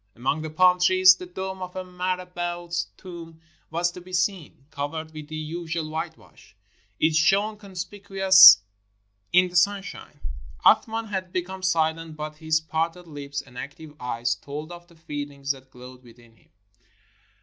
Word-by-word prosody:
Among 135 +6 -1
the 160 - -5
palm 180 +3 +4
trees, 185 +1 +6
the 180 - -9
dome 190 +1 -6
of 180 0 -7
a 185 - -4
mara 180 0 -3
bout's 175 -1 -4
tomb 170 -3 -10 0.3
was 170 +2 0
to 180 - -11
be 185 +1 -14
seen. 180 -6 -2
Covered 155 +3 -5
with 155 -1 -9
the 155 - -7
usual 160 0 -4
whitewash, 160 0 -8 0.4
it 160 0 +3
shone 195 +7 +3
conspicuous 190 - +6 0.7
in 180 +1 +5
the 180 - -12
sunshine. 200 +2 0 0.5
Ath - - +6
man 225 0 -3
had 190 -4 -4
become 185 +1 -4
silent, 165 -3 0
but 155 0 -6
his 160 0 +1
parted 165 +2 -3
lips 145 -2 -6
and 125 -2 -12
active 150 +1 -9
eyes 120 -1 -1
told 145 +7 -8
of 175 0 -11
the 170 - -21
feelings 145 -3 -5
that 135 -1 -9
glowed 125 0 -13
within 120 -1 -19
him. - - -29
170 Hz, 160 wpm, -25 LUFS, 150-185 Hz, 0.7 s, trees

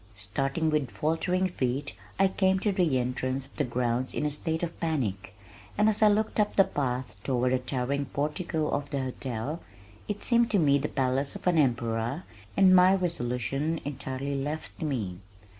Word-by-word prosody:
Starting 135 - -1
with 150 -5 +1
faltering 165 +7 0
feet 140 -4 -2 0.2
I 195 - +5
came 190 0 +2
to 210 - +2
the 175 -8 +2
entrance 130 +1 -1
of 140 - -21
the 150 - +2
grounds 125 0 -1
in - - -1
a 150 - 0
state 160 +3 -2
of 170 -1 -4
panic, 105 - -2 0.4
and 210 +1 +4
as 220 0 +2
I 215 - +7
looked 215 +1 +1
up 210 - +2
the 195 - +7
path 130 - -2
toward 125 -1 +1
the 130 - +2
towering 130 +2 -2
portico 150 +3 -2
of 140 0 -2
the 140 - -2
hotel, 130 +3 -4 0.5
it 205 -1 -3
seemed 235 -1 +3
to 210 - +2
me 140 -5 +4
the 145 - -1
palace 135 +1 0
of - - -9
an 175 -3 +3
emperor 120 +2 0 0.3
and 190 -1 +7
my 185 +1 +7
resolution 150 - -1
entirely 140 0 -4
left 145 +3 -4
me. 110 - -2
140 Hz, 175 wpm, -28 LUFS, 125-170 Hz, 0.5 s, I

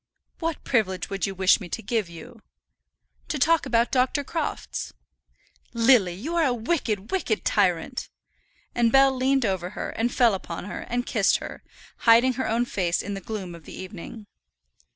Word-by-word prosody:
"What 330 -2 -3
privilege 200 -8 0
would 195 0 -1
you 195 - -5
wish 190 0 +4
me 180 - -7
to - - -5
give 215 -3 -1
you?" 170 +6 -12 0.9
"To 305 - -2
talk 325 +4 +3
about 235 +1 +2
Dr. 260 +2 +2
Crofts." 330 +4 -4 0.8
"Lily, 230 -7 +4
you 295 - -4
are 335 - +3
a 255 -5 +2
wicked, 220 - -2
wicked 385 - -1
tyrant." - - +1 0.6
And 235 -1 +2
Bell 270 +1 +5
leaned 265 0 +2
over 185 -3 -1
her, - - -3
and 235 +2 -1
fell 240 -4 +4
upon 190 - -5
her, 205 - -6
and 245 +1 -1
kissed 205 -5 +2
her, - - -8 0.4
hiding 235 +2 +5
her 260 +2 -2
own 235 +2 +1
face 180 -7 -1
in 205 - -4
the 195 - -5
gloom 190 -3 -6
of 165 -3 -12
the - - -10
evening. 205 +3 -9
230 Hz, 175 wpm, -25 LUFS, 195-260 Hz, 0.9 s, Bell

